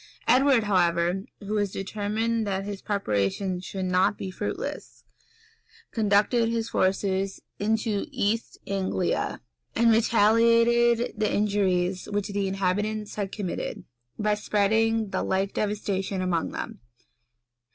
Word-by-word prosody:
Edward, 260 Hz, -2 st, +5 dB
however, 180 Hz, -1 st, +1 dB, 0.2 s
who 205 Hz, +1 st, -4 dB
was 205 Hz, -2 st, 0 dB
determined 215 Hz, +3 st, -2 dB
that 195 Hz, 0 st, -2 dB
his 200 Hz, -1 st, -5 dB
preparations 180 Hz, -, -1 dB
should 190 Hz, 0 st, -4 dB
not 185 Hz, +2 st, +2 dB
be 190 Hz, -, -5 dB
fruitless, -, -, -5 dB, 0.9 s
conducted 220 Hz, +2 st, +2 dB
his 230 Hz, 0 st, -1 dB
forces 195 Hz, -2 st, 0 dB, 0.2 s
into 220 Hz, +2 st, 0 dB
East 230 Hz, -3 st, -1 dB
Anglia, 190 Hz, -2 st, -1 dB, 0.3 s
and 230 Hz, 0 st, +4 dB
retaliated 230 Hz, +2 st, +4 dB
the 215 Hz, -, +1 dB
injuries 190 Hz, -3 st, +1 dB
which 205 Hz, 0 st, -2 dB
the 200 Hz, -1 st, -1 dB
inhabitants 205 Hz, +3 st, -1 dB
had 200 Hz, -2 st, -3 dB
committed, 200 Hz, -4 st, -4 dB, 0.3 s
by 210 Hz, 0 st, +1 dB
spreading 220 Hz, +1 st, +1 dB
the -, -, -1 dB
like 195 Hz, +1 st, 0 dB
devastation 200 Hz, -2 st, -2 dB
among 180 Hz, -3 st, 0 dB
them. -, -, -6 dB
205 Hz, 115 wpm, -26 LUFS, 190-220 Hz, 0.9 s, Edward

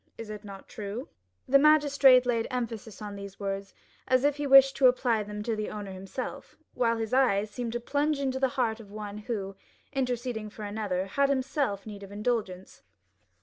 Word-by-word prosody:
Is 225 Hz, -2 st, -7 dB
it 210 Hz, 0 st, -8 dB
not 195 Hz, -2 st, -10 dB
true?" 215 Hz, +5 st, -6 dB, 0.4 s
The 275 Hz, +2 st, +6 dB
magistrate 285 Hz, -4 st, +6 dB
laid 230 Hz, -2 st, 0 dB
emphasis 225 Hz, -4 st, -5 dB
on 205 Hz, -1 st, -6 dB
these 200 Hz, -1 st, -9 dB
words, 195 Hz, -1 st, -4 dB, 0.3 s
as 255 Hz, 0 st, +3 dB
if 290 Hz, 0 st, +2 dB
he 290 Hz, -1 st, -2 dB
wished 270 Hz, 0 st, +8 dB
to 270 Hz, -1 st, +6 dB
apply 245 Hz, -3 st, +2 dB
them 210 Hz, 0 st, -6 dB
to 225 Hz, 0 st, -1 dB
the 215 Hz, 0 st, -3 dB
owner 205 Hz, -2 st, -6 dB
himself, 190 Hz, +7 st, -7 dB, 0.2 s
while 230 Hz, -2 st, +1 dB
his 225 Hz, +1 st, -3 dB
eyes 215 Hz, -6 st, +3 dB
seemed 240 Hz, -1 st, -4 dB
to 240 Hz, -, -1 dB
plunge 290 Hz, +4 st, 0 dB
into 265 Hz, -1 st, -1 dB
the 265 Hz, -, +3 dB
heart 230 Hz, -3 st, +1 dB
of 215 Hz, -3 st, -12 dB
one 210 Hz, 0 st, -7 dB
who, 205 Hz, -3 st, -4 dB, 0.4 s
interceding 245 Hz, -4 st, -2 dB
for 215 Hz, 0 st, -10 dB
another, 205 Hz, -3 st, -2 dB
had 275 Hz, +8 st, +1 dB
himself 265 Hz, -6 st, -1 dB
need 205 Hz, -2 st, -8 dB
of 200 Hz, 0 st, -10 dB
indulgence. 205 Hz, -4 st, -3 dB
225 Hz, 190 wpm, -28 LUFS, 205-260 Hz, 0.4 s, wished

